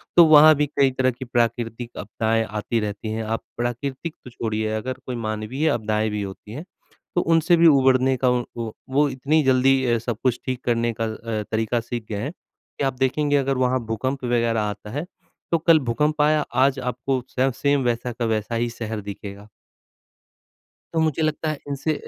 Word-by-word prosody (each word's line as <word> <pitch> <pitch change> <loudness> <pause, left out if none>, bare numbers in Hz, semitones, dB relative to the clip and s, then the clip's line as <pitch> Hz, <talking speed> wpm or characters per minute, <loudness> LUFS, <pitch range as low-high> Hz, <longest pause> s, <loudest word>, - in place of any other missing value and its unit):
तो 170 - +9
वहाँ 155 0 +8
भी 150 - +1
कई 140 -1 +2
तरह 130 0 +1
की 125 +2 -8
प्राकृतिक 120 0 -1
आपदाएँ 110 +2 0
आती 110 +2 -2
रहती 105 +1 -4
हैं। 110 0 -2
आप 110 +1 -3
प्राकृतिक 130 +6 -3
तो 125 - -8
छोड़िए 110 -2 -2
अगर 125 +4 -3
कोई 125 - -4
मानवीय 110 +6 -2
आपदाएँ 110 -4 0
भी 105 0 -3
होती 100 +1 -8
हैं, 140 +8 -6 0.5
तो 175 - +3
उनसे 165 +1 +3
भी 165 0 +6
उभरने 130 -2 +4
का 125 - +5
उ 125 -1 +1
वो 115 -2 -4 0.2
वो 145 +3 +3
इतनी 140 +4 +1
जल्दी 130 0 +3
अ, 120 -1 +2
सब 115 -1 -4
कुछ 125 -2 +1
ठीक 130 -2 -3
करने 115 -1 +1
का 115 - +2
अ, 110 -1 -4
तरीका 110 +2 0
सीख 115 -1 -5
गए 105 -2 -3
हैं, 140 +7 -3
कि 175 - -11
आप 135 - 0
देखेंगे 145 +2 +1
अगर 135 -1 0
वहाँ 130 0 +2
भूकंप 130 +5 -3
वगैरह 115 -2 +1
आता 105 0 -4
है 145 +8 -3 0.5
तो 170 - +4
कल 165 -1 +5
भूकंप 150 +5 0
आया, 150 +1 +4
आज 135 0 +3
आपको 125 +1 -2 0.2
स 135 +1 +3
सेम 140 -1 +1
वैसा 120 0 -1
का 120 0 -3
वैसा 110 +1 -1
ही 120 +1 0
शहर 110 -2 -5
दिखेगा। 100 0 -8 1.5
तो 165 - +1
मुझे 160 -1 +1
लगता 155 0 0
है 155 - -2
इनसे 145 +3 -1
125 Hz, 195 wpm, -23 LUFS, 115-140 Hz, 1.5 s, तो